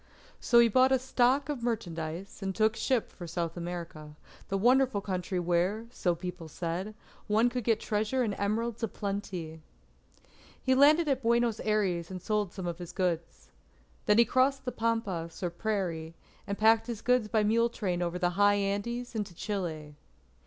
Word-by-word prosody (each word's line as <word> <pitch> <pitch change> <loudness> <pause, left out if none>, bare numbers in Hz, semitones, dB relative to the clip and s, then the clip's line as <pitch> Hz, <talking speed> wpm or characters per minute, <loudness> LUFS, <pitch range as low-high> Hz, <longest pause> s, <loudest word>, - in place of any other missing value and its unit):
So 240 - +3
he 235 0 +8
bought 255 +4 +4
a 265 - +5
stock 260 +2 +2
of 290 -5 -3
merchandise, 175 -5 -4
and 190 -1 -3
took 220 0 +2
ship 250 -1 0
for 175 - -9
South 170 0 -3
America, 170 -3 -6 0.3
the 195 - -1
wonderful 250 +1 +3
country, 185 -1 -3
where, 180 +6 0
so 175 -7 0
people 180 -1 -7
said, 175 +6 -4 0.3
one 220 +3 +3
could 245 0 -3
get 225 0 +2
treasure 220 +5 0
and 215 -4 -1
emeralds 225 +3 -1
a 225 - +1
plenty. 190 -6 -5 1.0
He 260 - +1
landed 300 +5 +5
at 270 -2 +1
Buenos 235 -1 +2
Aires, 190 -6 0
and 185 -1 -6
sold 210 0 -1
some 190 - -6
of 175 0 -4
his 175 -2 -8
goods. 175 -3 -3 0.6
Then 210 - +5
he 235 - +7
crossed 265 +2 +2
the 250 - -1
pampas, 205 -9 -2
or 175 - -1
prairie, 170 -5 -3 0.3
and 200 0 -3
packed 225 +1 +4
his 230 -2 -5
goods 250 -3 +2
by 215 -1 +1
mule 230 +3 +3
train 185 -6 -2
over 175 0 -1
the 180 0 +1
high 205 +2 +4
Andes 205 +5 -2
into 205 -6 -4
Chile. 165 -7 -4
205 Hz, 175 wpm, -30 LUFS, 175-235 Hz, 1.0 s, he